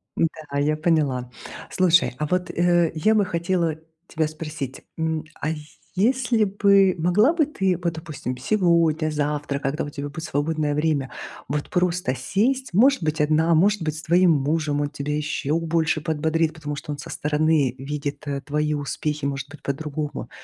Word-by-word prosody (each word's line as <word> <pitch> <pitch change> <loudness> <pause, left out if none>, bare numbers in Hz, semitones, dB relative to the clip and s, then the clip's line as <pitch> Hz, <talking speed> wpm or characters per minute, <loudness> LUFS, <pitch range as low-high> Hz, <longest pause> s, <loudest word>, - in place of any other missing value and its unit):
М-да, 155 -3 -2
я 150 +2 +2
поняла. 150 -6 +1 0.4
Слушай, 180 -6 +3
а 150 - -1
вот, 180 +2 0
э, 175 -1 +2
я 215 +8 +3
бы 210 -2 +3
хотела 170 -2 0 0.3
тебя 160 -1 0
спросить, 150 -3 -6 0.2
м, 160 -1 -1 0.2
а 155 - 0 0.5
если 240 +2 +2
бы 195 -1 +4
могла 200 - +3
бы 320 -4 +3
ты, 190 - 0
вот 170 -1 0
допустим, 145 -6 -6
сегодня-завтра, 155 -5 +1
когда 140 +1 -2
у 145 - -5
тебя 145 0 -5
будет 160 +2 -7
свободное 150 0 -1
время. 150 -3 0 0.4
Вот 145 +2 -3
просто 180 -6 +1
сесть, 230 - 0
может 265 +6 +5
быть 155 0 -1
одна, 155 +2 +3
может 200 +3 +3
быть 155 -1 -2
с 160 - -8
твоим 175 +1 +4
мужем- 150 0 +1
он 145 - -1
тебя 145 0 -3
ещё 150 0 -1
больше 165 -1 0
подбодрит, 160 +1 0
потому 150 -2 -5
что 145 - -6
он 145 - -4
со - - -8
стороны 150 -3 +1
видит, 145 +1 -5
э, 140 -1 -2
твои 150 +1 -1
успехи, 150 0 -3
может 140 0 -3
быть 150 - -12
по-другому. 150 +1 -4
155 Hz, 165 wpm, -23 LUFS, 145-175 Hz, 0.5 s, может